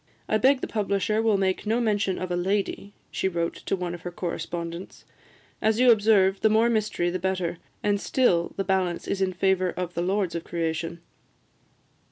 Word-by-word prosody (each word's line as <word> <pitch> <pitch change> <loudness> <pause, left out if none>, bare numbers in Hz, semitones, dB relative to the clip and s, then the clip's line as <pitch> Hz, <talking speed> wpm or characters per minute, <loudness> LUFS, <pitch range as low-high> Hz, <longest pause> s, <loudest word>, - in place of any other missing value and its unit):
"I 215 - +2
beg 265 +2 +4
the - - -2
publisher 210 0 0
will 220 -3 +3
make 190 +1 -1
no 225 +3 +2
mention 205 -4 +1
of 185 -1 -4
a - - +1
lady," 195 +2 -1 0.2
she - - -1
wrote 170 -2 -1
to - - -3
one 180 -2 -4
of 175 - -8
her 175 - -5
correspondents, 170 0 -5 0.6
"as 220 +1 +2
you 250 -1 +7
observe, 205 -3 +4
the 220 - +4
more 225 +2 +4
mystery 210 -6 0
the 185 - -2
better, 185 -2 -2 0.2
and 205 -1 +1
still 175 -10 +2
the 195 - 0
balance 185 -2 0
is 195 - -2
in 190 -1 +2
favour 185 0 +1
of 180 -1 -4
the 170 - -2
lords 190 -1 0
of 170 -1 -3
creation. 165 0 -3
190 Hz, 190 wpm, -26 LUFS, 175-210 Hz, 0.6 s, you